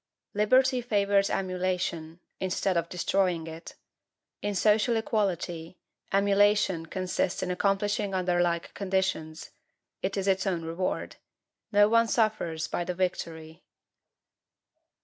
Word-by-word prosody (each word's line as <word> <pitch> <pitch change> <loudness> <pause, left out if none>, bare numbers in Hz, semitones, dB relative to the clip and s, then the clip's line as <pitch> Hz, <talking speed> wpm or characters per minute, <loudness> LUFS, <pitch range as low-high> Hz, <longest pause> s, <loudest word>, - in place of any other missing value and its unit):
Liberty 255 +5 +3
favors 200 -4 +2
emulation, 180 -3 -2 0.2
instead 190 0 0
of 170 0 0
destroying 180 -2 0
it. 165 +1 -9 0.7
In 205 0 -2
social 215 +4 +3
equality, 180 -6 -2 0.3
emulation 200 -3 +3
consists 185 +1 -2
in 180 - -2
accomplishing 200 +1 0
under 180 -1 +1
like 170 -1 -1
conditions; 190 -5 -2 0.5
it 195 +2 -2
is 195 0 -1
its 190 0 +2
own 175 -3 -1
reward. 170 +3 -3 0.5
No 205 0 +6
one 230 +1 +4
suffers 215 -8 0
by 175 - -2
the 180 +1 -4
victory. 165 -2 -4
190 Hz, 110 wpm, -28 LUFS, 175-205 Hz, 0.7 s, No